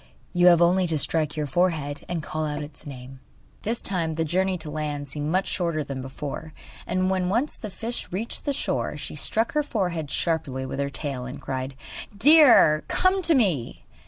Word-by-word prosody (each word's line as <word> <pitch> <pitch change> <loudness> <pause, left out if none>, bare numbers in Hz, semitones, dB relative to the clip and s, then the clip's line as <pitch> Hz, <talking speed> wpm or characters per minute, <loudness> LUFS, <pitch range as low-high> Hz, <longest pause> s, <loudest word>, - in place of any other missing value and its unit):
You 175 0 +5
have 175 -1 +7
only 180 +1 +3
to 160 -2 0
strike 155 +1 0
your 150 - 0
forehead, 155 -3 0
and 170 -3 -2
call 155 0 -3
out 150 -1 -3
its 145 0 -10
name.' 130 -1 -9 0.4
This 225 +2 -2
time 165 -5 0
the 165 +1 0
journey 185 +3 +1
to 160 -2 -5
land 150 -2 -3
seemed 145 +2 -4
much 185 +2 +1
shorter 170 -4 -1
than 135 -2 -5
before, 145 +4 -7 0.3
and 185 +1 +1
when 185 -1 0
once 240 +9 0
the 215 - -7
fish 230 +5 -5
reached 210 +6 -4
the 285 - +1
shore - - -2
she - - -5
struck 225 +1 +1
her 300 - +2
forehead 180 - -2
sharply 150 -6 -1
with 135 +1 -5
her 140 0 0
tail, 135 -2 -4
and 125 - -7
cried: 130 0 -4 0.4
'Deer, 265 - +7
come 375 +1 +2
to 330 -2 +4
me! 180 - 0
160 Hz, 190 wpm, -25 LUFS, 145-190 Hz, 0.4 s, have